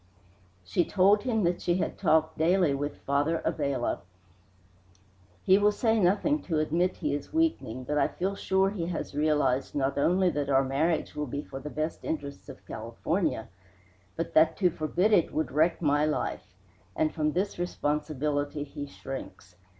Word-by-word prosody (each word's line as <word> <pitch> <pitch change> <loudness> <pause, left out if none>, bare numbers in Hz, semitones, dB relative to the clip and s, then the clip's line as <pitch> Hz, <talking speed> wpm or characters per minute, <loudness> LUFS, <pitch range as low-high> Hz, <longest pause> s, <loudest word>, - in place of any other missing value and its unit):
She 95 - +1
told 200 +3 +4
him 220 -2 0
that 175 0 0
she 175 - +1
had 185 - -1
talked 160 -4 +2
daily 170 -1 +3
with 145 +1 -3
Father 145 +4 +1
Abella. 140 -5 -1 1.4
"He 190 +1 +5
will 205 0 +4
say 225 +1 +1
nothing 210 +11 +2
to 165 -4 -2
admit 170 +4 +1
he 150 -4 -1
is 145 -1 -5
weakening, 315 - 0
but 150 +3 -1
I - - +3
feel 190 +3 -2
sure 195 0 +1
he 175 -5 -3
has 170 -4 -4
realized 145 -3 +1
not 140 0 0
only 180 +4 +3
that 145 -3 -2
our 135 0 +4
marriage 155 +5 0
will 150 0 -3
be 140 +3 -4
for 135 - -8
the 145 +2 -7
best 155 +2 -3
interests 140 -2 -5
of 135 - -11
California, 115 - -2 0.7
but 165 - -4
that 160 +1 +4
to 180 -3 +3
forbid 175 +6 +1
it 175 - +4
would 155 -4 -1
wreck 160 +5 +2
my 145 0 +3
life; 150 -10 -3 0.4
and 155 - +1
from 155 -2 0
this 190 +1 -2
responsibility 150 -3 -1
he 145 0 -7
shrinks. 135 -10 -9
155 Hz, 165 wpm, -28 LUFS, 145-180 Hz, 1.4 s, He